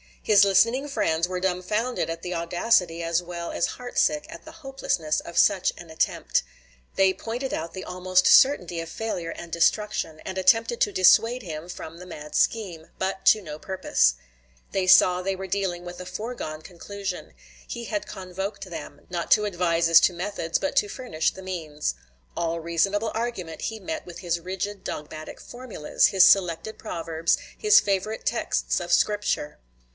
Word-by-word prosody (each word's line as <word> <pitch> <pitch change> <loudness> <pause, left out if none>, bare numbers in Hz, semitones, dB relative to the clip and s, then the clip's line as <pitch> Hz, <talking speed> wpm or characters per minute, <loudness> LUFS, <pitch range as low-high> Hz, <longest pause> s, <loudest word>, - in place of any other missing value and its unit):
His 205 -2 +6
listening 230 +8 +3
friends 175 - 0
were 180 0 -3
dumfounded 190 +3 -1
at 165 0 -4
the 180 - -4
audacity 170 0 +1
as 165 +1 +1
well 170 -1 -6
as - - 0
heart 245 -1 -4
sick 300 0 +2
at - - -11
the 315 - -10
hopelessness 270 - -2
of 170 - -9
such 195 -3 +4
an 175 -1 -11
attempt. 160 - 0 0.5
They 190 -1 +4
pointed 235 +7 -4
out 165 +1 -4
the 185 - -6
almost 185 0 +1
certainty 180 - +5
of 165 - -5
failure 180 -7 -4
and 170 0 -9
destruction, 170 -2 0
and 190 0 -6
attempted 225 +5 +3
to 205 - +3
dissuade 225 +7 +4
him 160 -1 -7
from 165 -2 -8
the 180 - -10
mad 150 -3 -9
scheme; 180 -8 0
but 190 0 -3
to 215 - +6
no 155 -4 -8
purpose. 165 - +1 0.6
They 190 -1 -1
saw 180 0 +6
they 195 +1 -1
were 190 0 -6
dealing 185 -2 -2
with 175 0 -8
a 180 - -7
foregone 185 -5 -6
conclusion; 195 +3 -7 0.3
he 235 -1 -6
had 310 +6 -3
convoked 190 +2 -6
them, 155 -4 -8
not 175 -1 -3
to 210 -1 +5
advise 170 -4 +1
as 165 0 +9
to 180 - +3
methods, 170 -2 -2
but 285 - -3
to 205 - +4
furnish 195 -9 -2
the 190 - -11
means. 160 -5 -3 0.4
All 170 0 -1
reasonable 195 +6 0
argument 220 -8 -4
he 220 -1 -3
met 320 +8 -5
with 175 - -10
his 170 -2 -1
rigid 190 +3 -5
dogmatic 155 +1 -7
formulas, 240 -11 0
his 190 -2 +6
selected 190 +2 +2
proverbs, 165 -4 -1 0.2
his 425 0 +6
favorite 205 +2 -2
texts 235 - 0
of 175 -1 -5
Scripture. 205 -5 +1
185 Hz, 170 wpm, -25 LUFS, 170-210 Hz, 0.6 s, as